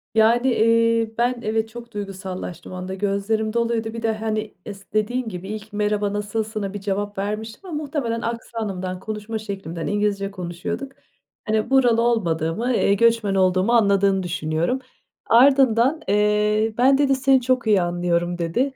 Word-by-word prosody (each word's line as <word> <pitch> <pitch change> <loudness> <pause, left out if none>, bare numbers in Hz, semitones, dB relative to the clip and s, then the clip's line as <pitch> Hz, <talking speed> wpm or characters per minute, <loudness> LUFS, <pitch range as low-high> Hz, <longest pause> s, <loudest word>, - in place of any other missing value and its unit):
Yani, 230 +3 +4
eee, 230 -1 +3
ben 245 +1 +1
evet, 220 0 -1
çok 235 +1 -10
duygusallaştım 190 -4 -6
o - - -6
anda, 185 +1 -5
gözlerim 205 +3 -1
doluydu 230 -1 -1
bir 230 - -5
de, 225 - +1
hani, 215 0 -3
is 200 -1 -8
dediğin 230 +3 0
gibi, 180 -1 -7
ilk 215 0 -7
merhaba 210 -1 0
nasılsına 210 -1 -3
bir 205 - -4
cevap 205 0 -3
vermiştim 215 - -4
ama 330 - -6
muhtemelen 240 -6 -2
aksanımdan, 205 -6 -4
konuşma 215 +2 -5
şeklimden 195 -6 -5
,İngilizce 205 -1 0
konuşuyorduk, 185 +8 -5 0.5
hani, 215 +1 0
buralı 245 -4 +4
olmadığımı, 220 0 0
eee, 200 - +3
göçmen 230 -2 +2
olduğumu 185 +3 +2
anladığını 200 -3 +3
düşünüyorum. 170 +7 -1 0.5
Ardından, 265 +3 +4
eee, 210 +2 +2
"ben" 265 +2 +5
dedi 275 -1 +3
"Seni 265 0 +3
çok 255 -2 0
iyi 200 -4 +4
anlıyorum." 175 0 0
dedi. 240 +12 -1
215 Hz, 145 wpm, -22 LUFS, 195-230 Hz, 0.5 s, ben